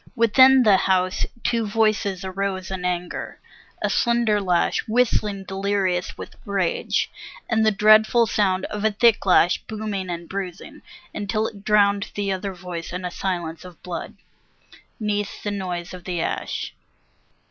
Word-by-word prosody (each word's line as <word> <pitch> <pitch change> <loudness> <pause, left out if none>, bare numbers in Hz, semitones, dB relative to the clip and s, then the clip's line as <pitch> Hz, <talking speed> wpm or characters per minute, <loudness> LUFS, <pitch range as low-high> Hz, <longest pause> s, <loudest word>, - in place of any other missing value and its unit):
Within 260 +3 +6
the 205 -4 +6
house 185 -1 +1 0.2
two 230 -1 +1
voices 205 -3 0
arose 190 0 -3
in 185 -1 -4
anger, 180 0 -3 0.4
a - - +1
slender 235 -3 +2
lash 180 -3 +1
Whistling 215 -4 +1
delirious 190 -2 -1 0.3
rage, 195 -4 -1 0.4
and 225 -2 +2
the 220 - +5
dreadful 215 +3 +5
sound 190 -4 +1
Of 210 0 -5
a 220 - +4
thick 220 +1 +3
lash 180 -1 +4
booming 210 -4 -4
and 170 -1 -5
bruising, 190 -2 -6 0.3
until 215 +1 -1
it 200 -2 -7
drowned 200 -1 +3
The 200 -1 -1
other 190 0 -3
voice 175 -2 -7
in 180 +1 -5
a 180 - -3
silence 175 -4 -3
of 180 -2 -13
blood, 175 -2 -6 0.8
'neath 205 -2 -2
the 205 - -2
noise 180 -3 -4
of 180 -1 -10
the 180 -2 -3
ash. - - -3
200 Hz, 145 wpm, -23 LUFS, 180-215 Hz, 0.8 s, Within